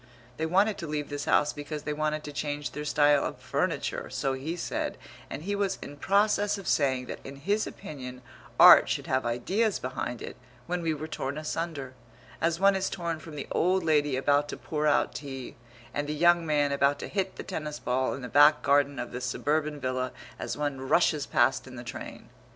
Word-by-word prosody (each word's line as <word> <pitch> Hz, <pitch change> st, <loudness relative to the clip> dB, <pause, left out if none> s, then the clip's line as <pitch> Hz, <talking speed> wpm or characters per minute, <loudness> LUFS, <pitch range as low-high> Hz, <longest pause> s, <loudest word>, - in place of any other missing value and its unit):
They 160 Hz, -, -1 dB
wanted 195 Hz, +5 st, +2 dB
to 170 Hz, -, -5 dB
leave 150 Hz, -1 st, -3 dB
this 145 Hz, 0 st, -4 dB
house 150 Hz, 0 st, +3 dB
because 145 Hz, 0 st, -6 dB
they 150 Hz, -, -2 dB
wanted 155 Hz, 0 st, -1 dB
to 145 Hz, -, -7 dB
change 145 Hz, 0 st, -3 dB
their 150 Hz, -, -5 dB
style 145 Hz, -1 st, +4 dB
of -, -, -3 dB
furniture, -, -, -2 dB
so 135 Hz, -, -1 dB
he 140 Hz, +6 st, -4 dB
said, 175 Hz, -, -3 dB, 0.3 s
and 145 Hz, -, -6 dB
he 205 Hz, +3 st, -1 dB
was 200 Hz, -1 st, 0 dB
in 145 Hz, -, -8 dB
process 205 Hz, +5 st, +2 dB
of 195 Hz, -, -8 dB
saying 130 Hz, -3 st, +2 dB
that -, -, -6 dB
in 135 Hz, -, -8 dB
his 200 Hz, +10 st, 0 dB
opinion 125 Hz, -4 st, -8 dB, 0.4 s
art -, -, +9 dB
should -, -, -1 dB
have 130 Hz, -2 st, 0 dB
ideas 190 Hz, -, 0 dB
behind 125 Hz, -1 st, -4 dB
it -, -, -8 dB, 0.3 s
when 180 Hz, 0 st, -2 dB
we 165 Hz, -1 st, 0 dB
were 155 Hz, +1 st, -6 dB
torn 140 Hz, -2 st, -4 dB
asunder, 155 Hz, -4 st, -4 dB, 0.5 s
as 165 Hz, 0 st, +1 dB
one 195 Hz, 0 st, +5 dB
is 190 Hz, 0 st, 0 dB
torn 170 Hz, -4 st, -3 dB
from 155 Hz, 0 st, -10 dB
the 140 Hz, -, -5 dB
old 185 Hz, +1 st, +2 dB
lady 150 Hz, -3 st, +2 dB
about 145 Hz, +2 st, +2 dB
to -, -, -5 dB
pour 150 Hz, -1 st, -2 dB
out 145 Hz, -, +2 dB
tea 135 Hz, -3 st, -7 dB, 0.4 s
and 145 Hz, 0 st, -2 dB
the 150 Hz, -, -1 dB
young 175 Hz, +1 st, +4 dB
man 145 Hz, -2 st, +2 dB
about 140 Hz, 0 st, +2 dB
to -, -, -6 dB
hit 190 Hz, -1 st, -2 dB
the -, -, -6 dB
tennis 155 Hz, -5 st, -5 dB
ball 130 Hz, +1 st, 0 dB
in 135 Hz, -, -8 dB
the -, -, -4 dB
back 145 Hz, +3 st, +6 dB
garden 140 Hz, 0 st, +3 dB
of 120 Hz, 0 st, -4 dB
the 125 Hz, -, -5 dB
suburban 150 Hz, +4 st, -1 dB
villa 130 Hz, -1 st, -2 dB, 0.3 s
as -, -, -4 dB
one 145 Hz, -3 st, -2 dB
rushes 155 Hz, -4 st, +3 dB
past 130 Hz, +2 st, +2 dB
in 130 Hz, -, -10 dB
the 120 Hz, -, -7 dB
train. 120 Hz, -, -8 dB
150 Hz, 205 wpm, -28 LUFS, 140-165 Hz, 0.5 s, art